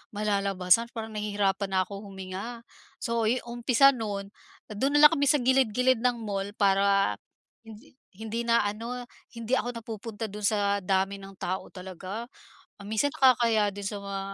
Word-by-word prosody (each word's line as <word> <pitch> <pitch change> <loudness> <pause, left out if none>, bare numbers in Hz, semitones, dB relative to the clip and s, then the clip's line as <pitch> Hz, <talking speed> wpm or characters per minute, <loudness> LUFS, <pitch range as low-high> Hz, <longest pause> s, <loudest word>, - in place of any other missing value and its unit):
malalabasan, 200 0 +2
parang 225 -1 -5
nahihirapan 205 -2 -1
na 190 -1 +2
akong 195 +1 -8
huminga." 195 +5 -7 0.4
So, 230 -1 0
yu 240 +3 +2
umpisa 240 +3 +4
no'n, 205 -5 -5 0.4
do'n 270 +8 0
na 295 - +5
lang 300 - +9
kami 285 0 +1
sa 295 - +5
gilid-gilid 255 -1 +3
ng 245 0 +1
mall, 200 -1 -4
para 195 -1 +3 0.5
hindi, 220 +6 -13 0.2
hindi 220 +3 -4
na 235 0 +4
ano, 230 +4 -4 0.3
hindi 230 +1 -4
ako 245 - -3
napupunta 225 0 -6
do'n 210 +1 -8
sa 200 -2 +1
dami 195 +1 0
ng 195 0 -11
tao 185 0 -4
talaga. 190 +6 -8 0.5
Ah, 200 - -10
minsan 220 +7 0
nakakahiya 230 -5 +4
din 200 0 -8
sa 200 +1 -3
mga 200 0 -5
210 Hz, 160 wpm, -27 LUFS, 195-235 Hz, 0.5 s, lang